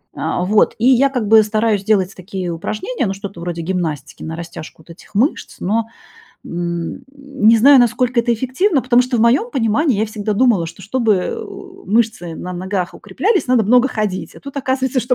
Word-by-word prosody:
А 180 - -2
вот, 215 +4 +3
и 235 +2 +1
я 265 +2 +4
как 250 -6 -2
бы 220 +1 +7
стараюсь 215 -1 0
делать 200 -3 +1
такие 185 -1 -5
упражнения, 215 - -3
ну, 195 - -2
что-то 195 -3 -8
вроде 170 -1 -4
гимнастики, 160 -4 -4
на 160 - -5
растяжку 165 -1 -9
вот 170 - -14
этих 170 - -17
мышц, 250 +10 0
но, 220 +4 -1 0.6
м, 170 +5 -4
не 275 -6 +2
знаю, 275 +4 +7
насколько 245 +1 +2
это 235 0 0
эффективно, 265 - 0
потому 250 -1 +4
что 250 -1 -2
в - - +2
моём 255 - +3
понимании 240 +1 +1
я - - +2
всегда 215 0 -3
думала, 210 -6 +2
что 170 +4 -11
чтобы, 225 +2 +1
э, 190 - -2
у 390 -2 -12
э, - - -10
мышцы 215 -7 0
на 180 +2 -6
ногах 185 0 -3
укреплялись, 425 -5 -1
надо 250 -3 +3
много 245 +4 +4
ходить. 210 -6 -3
А - - -13
тут 280 0 -10
оказывается, 260 -1 -1
что 245 +1 +1
220 Hz, 200 wpm, -18 LUFS, 185-255 Hz, 0.6 s, бы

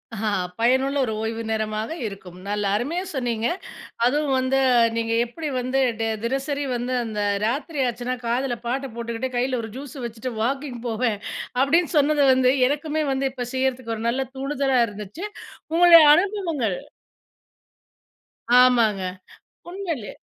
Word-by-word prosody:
அ 215 0 -1 0.3
பயனுள்ள 265 +4 +2
ஒரு 220 - -3
ஓய்வு 225 +1 -3
நேரமாக 215 +1 -2 0.2
இருக்கும். 190 -3 -10
நல்லா 205 0 -1
அருமையா 325 - -2
சொன்னீங்க. 240 -4 -1 0.6
அதுவும் 285 +2 +1
வந்து, 260 +1 +1 0.4
நீங்க 230 0 -1
எப்படி 305 +7 -6
வந்து 255 +2 0 0.2
டே 225 - 0 0.2
தினசரி 275 +4 -1
வந்து, 245 +1 -2
அந்த 215 -2 -4 0.3
ராத்திரி 280 +5 -2
ஆச்சுன்னா, 245 +1 -3
காதுல 240 +1 0
பாட்ட 270 +3 -2
போட்டுகிட்டு 235 +2 -3
கைல 250 0 0
ஒரு 225 - -7
ஜூஸு 275 -1 -8
வச்சிட்டு 235 +2 -5
வாக்கிங் 265 +1 -2
போவேன், 225 -2 0 0.4
அப்படின்னு 320 +5 +3
சொன்னது 295 0 +3
வந்து, 255 0 +4 0.2
எனக்குமே 305 +2 -1
வந்து 270 0 0 0.2
செய்யறதுக்கு 260 -3 -1
ஒரு 220 - -6
நல்ல 255 +3 0
தூண்டுதலா 270 -1 0
இருந்துச்சு. 210 - -7 0.5
உங்களுடைய 340 -1 +8
அனுபவங்கள் 335 - 0 1.8
ஆமாங்க. 230 -6 +4 0.7
உண்மையிலயே 345 - -5
255 Hz, 125 wpm, -23 LUFS, 230-280 Hz, 1.8 s, உங்களுடைய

